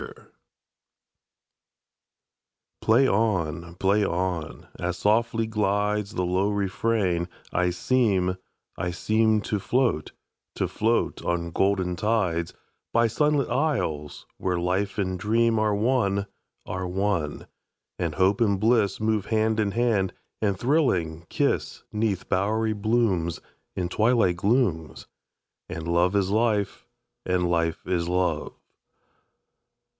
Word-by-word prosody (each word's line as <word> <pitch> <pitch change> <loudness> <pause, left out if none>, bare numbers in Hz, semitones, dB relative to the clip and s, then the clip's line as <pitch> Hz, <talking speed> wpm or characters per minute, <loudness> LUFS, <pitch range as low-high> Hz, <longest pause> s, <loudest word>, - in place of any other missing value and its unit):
1882.]PLAY 125 +5 +5
on! 85 - 0
Play 100 +3 +2
on! 90 -3 -2
As 90 0 -2
softly 115 +1 +1
glidesThe 105 -2 0
low 95 +3 +1
refrain, 100 -3 0 0.2
I 90 0 +2
seem, 95 -2 +1 0.4
I 90 - -3
seemTo 110 +2 +1
float, 120 - 0 0.4
to - - 0
float 115 +2 0
on 85 -1 -1
golden 95 -1 +1
tides, 90 -4 0 0.4
By 115 0 +3
sunlit 145 +4 +1
isles, 120 - -1
where 90 -1 0
life 95 +3 -1
and 95 -3 -1
dreamAre 110 0 +2
one, 100 -4 +1 0.4
are 95 0 -4
one; 90 -5 -1 0.5
and 85 -3 -2
hope 95 +3 +2
and 100 -4 +2
blissMove 110 -1 +2
hand 110 0 +1
in 105 -2 +2
hand, 115 -6 +1 0.3
and 100 -3 +1
thrilling, 90 - 0
kiss'Neath 105 -4 -1
bowery 110 +4 +1
blooms, 105 -6 0 0.4
In 90 -2 -1
twilight 110 -2 +2
glooms, 100 - 0 0.6
And 80 0 -5
love 85 +3 +2
is 100 -1 +1
life, 110 -2 0 0.4
and 90 -1 +1
life 85 -1 0
is 85 -2 -1
love. 90 -4 -1
100 Hz, 105 wpm, -25 LUFS, 90-110 Hz, 0.6 s, 1882.]PLAY